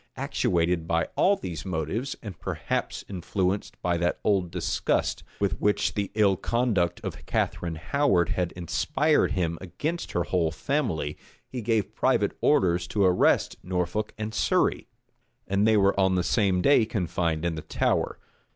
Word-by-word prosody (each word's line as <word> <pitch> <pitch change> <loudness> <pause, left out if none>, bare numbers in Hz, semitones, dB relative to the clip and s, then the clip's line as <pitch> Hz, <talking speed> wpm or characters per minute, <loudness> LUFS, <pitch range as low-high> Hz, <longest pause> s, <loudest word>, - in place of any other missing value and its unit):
Actuated 85 -1 0
by 85 0 0
all 200 +2 +4
these 90 - -6
motives, 95 - -3
and 100 -6 -8
perhaps - - -3
influenced 95 +1 -2
by 90 -1 +1
that 85 +1 0
old 95 -4 +2
disgust 90 +1 -1 0.2
with 100 -1 -1
which 105 0 +2
the 100 -2 -2
ill 100 -3 +4
conduct 110 -5 0
of - - -6
Catharine 85 -2 -1
Howard 90 - +1
had 90 -2 -1
inspired 90 -2 +1
him 85 -3 -1
against 155 - -4
her 90 - +1
whole 85 -3 +1
family, 90 - -2 0.3
he 125 - -5
gave 110 -2 0
private - - +1
orders 85 -1 +3
to 100 +1 +1
arrest 90 -1 +3
Norfolk 90 +4 -2
and 110 0 -4
Surrey; - - +1 0.6
and 100 +2 +2
they 110 -1 +5
were 100 -1 +3
on 95 -1 +3
the 90 - +1
same 95 -2 +2
day 140 -5 +5
confined 85 -6 -1
in 85 - 0
the 80 - -5
Tower. - - 0
95 Hz, 150 wpm, -26 LUFS, 85-105 Hz, 0.6 s, they